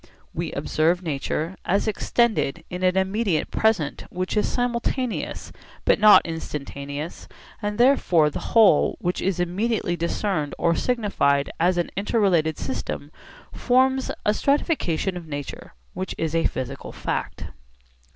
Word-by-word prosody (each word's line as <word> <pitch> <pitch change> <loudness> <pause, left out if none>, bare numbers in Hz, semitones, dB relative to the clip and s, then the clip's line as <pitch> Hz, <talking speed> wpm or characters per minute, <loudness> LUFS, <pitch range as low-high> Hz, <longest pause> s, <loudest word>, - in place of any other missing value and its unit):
We - - -3
observe 170 +4 +1
nature 155 +3 -2
as 200 +4 +1
extended 215 - +1
in 180 0 -5
an 185 0 +2
immediate 190 -3 0
present 215 -10 0
which 185 +3 -3
is 210 - +1
simultaneous 245 0 -2 0.3
but - - +4
not 210 0 +8
instantaneous, 145 -1 -6 0.3
and 210 -1 -2
therefore 185 - +4
the - - -4 0.2
whole 210 -9 +5
which 180 +1 -2
is 190 -1 -1
immediately 180 +1 0
discerned 170 -2 -2
or 170 0 +2
signified 170 - +1
as 175 +2 +2
an 175 - -1
inter 205 +4 0
related 165 -6 +2
system 135 +2 -4 0.4
forms 260 +1 +2 0.2
a 210 - +4
stratification 215 - 0
of 170 -2 -9
nature 145 - -7 0.2
which 185 0 -4
is 160 -1 -2
a 165 -1 +3
physical 135 +2 -6
fact. - - -4
180 Hz, 130 wpm, -24 LUFS, 155-215 Hz, 0.4 s, not